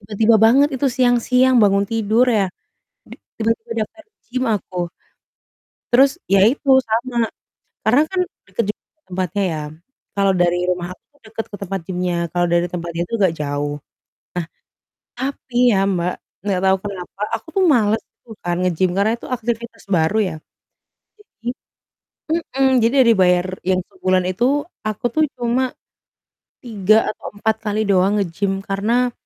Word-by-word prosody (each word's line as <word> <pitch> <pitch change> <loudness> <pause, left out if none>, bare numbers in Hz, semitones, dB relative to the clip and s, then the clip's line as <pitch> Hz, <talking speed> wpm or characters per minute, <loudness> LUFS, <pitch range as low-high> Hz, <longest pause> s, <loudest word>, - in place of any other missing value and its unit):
Tiba-tiba 215 +2 +3
banget 260 +6 +6
itu 275 +2 0
siang-siang 250 0 +3
bangun 200 -1 +4
tidur 225 +3 +2
ya. 210 -5 +3 0.6
Di - - -11 0.2
tiba-tiba 225 +1 -1
daftar 325 +7 -19 0.2
gym 255 +1 -2
aku. 195 -4 -2 1.1
Terus, 265 +3 +6 0.2
ya 195 0 +4
itu 275 +1 -2 0.2
sama. 235 +2 -1 0.7
Karena 245 +6 +5
kan 380 - -2 0.3
deket 200 +3 -1
juga - - -71 0.3
tempatnya, 185 +2 -1
ya. 155 - -3 0.6
Kalau 195 -1 +3
dari 175 -1 +2
rumah 180 -1 -1
aku - - -25 0.2
deket 225 0 -5
ke - - -5
tempat 195 0 -3
gim-nya, 180 -1 -1 0.2
kalau 175 0 +2
dari 170 0 +2
tempat 170 -1 -5
dia 170 +1 -1
itu 230 - -3
agak 190 -4 +3
jauh. 145 0 -2 1.5
Nah, 265 +2 0
tapi 245 - -11 0.2
ya, 195 - +3
Mbak, 180 -2 0 0.3
nggak 190 -3 +1
tau 190 0 +4
kenapa 195 0 -7
aku 225 - -15
tuh - - +4
males 220 -6 +3 0.2
gitu 235 - -23
kan 175 0 -2
nge-gym, 180 0 +1
karena 200 +2 +3
itu - - -10
aktivitas 235 -2 -4
baru 165 +1 +2
ya. 180 -4 -3 0.8
Jadi 240 - -11 0.9
mhm, 270 -5 +1
jadi 230 +3 +3
yang 250 - +4
dibayar 180 -1 +3 0.2
yang 185 0 +1
sebulan 185 0 0
itu, 185 +6 0 0.4
aku 215 +1 -4
tuh 310 - +3 0.2
cuma 245 +2 0 0.9
3 215 -2 +2
atau - - -10
4 220 +1 +1
kali 215 -1 -1
doang 195 -1 +3
nge-gym, 195 +2 -2
karena 230 +6 0
205 Hz, 150 wpm, -20 LUFS, 185-235 Hz, 1.5 s, banget